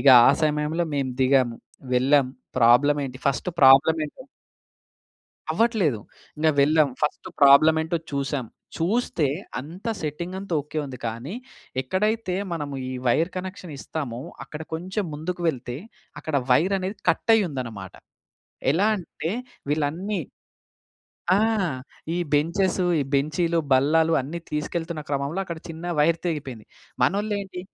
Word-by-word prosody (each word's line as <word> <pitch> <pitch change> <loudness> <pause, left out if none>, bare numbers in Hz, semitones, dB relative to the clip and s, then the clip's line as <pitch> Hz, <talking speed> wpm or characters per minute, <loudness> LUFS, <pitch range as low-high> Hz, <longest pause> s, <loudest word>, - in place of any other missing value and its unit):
ఇగ 140 - +4 0.2
ఆ! - - +8
సమయంలో 150 +3 0
మేము 135 -2 -1
దిగాం, 130 -2 +4 0.4
వెళ్ళాము 130 +1 +4 0.3
ప్రాబ్లమ్ 130 +5 +5
ఏంటి 130 0 -9
ఫస్ట్ 140 +6 0
ప్రాబ్లమ్ 135 +4 +7
ఏంటి? 205 - -10 1.3
అవ్వట్లేదు. 210 - +2 0.4
ఇంగ 155 +1 +2
వెళ్ళాం. 150 +1 +4
ఫస్ట్ 150 - -1
ప్రాబ్లమ్ 145 +3 +7
ఏంటో 160 +2 -1 0.2
చూసాం. 140 -2 -2 0.3
చూస్తే 175 -2 +1 0.3
అంతా 175 - -6
సెట్టింగ్ 170 +5 -4
అంతా 195 -2 -7
ఓకె 150 +2 -5
ఉంది 130 -3 -8
కానీ, 115 - -5 0.5
ఎక్కడైతే 190 - 0 0.2
మనము 145 -4 -4
ఈ - - -4
వైర్ 160 +9 +3
కనెక్షన్ 185 -3 -6
ఇస్తామో 135 -6 -5 0.2
అక్కడ 150 +1 -8
కొంచెం 190 +5 -3
ముందుకు 170 +4 -4
వెళ్తే 125 -4 -3 0.4
అక్కడ 155 -3 -2
వైర్ 175 +10 +4
అనేది 190 +3 -4
కట్ - - +2
అయ్యుందన్నమాట. 125 - -3 0.8
ఎలా 200 +6 +3
అంటే 165 -2 -5 0.4
వీళ్ళన్నీ 165 +7 -1 1.1
ఆ! - - +5 0.8
ఈ - - -1 0.2
బెంచెసు, 175 +5 +1
ఈ - - +2
బెంచీలు, 155 +5 +1
బల్లాలు 155 +5 +4
అన్నీ 155 +6 -6
తీసుకెళ్తున్న 160 +1 -3
క్రమంలో 140 +5 -1
అక్కడ 170 -3 -6
చిన్న 165 +1 -7
వైర్ 165 +2 +4
తెగిపోయింది. 135 -9 -4 0.4
మనోళ్ళేంటి, 200 +5 0
155 Hz, 125 wpm, -24 LUFS, 140-180 Hz, 1.3 s, ఆ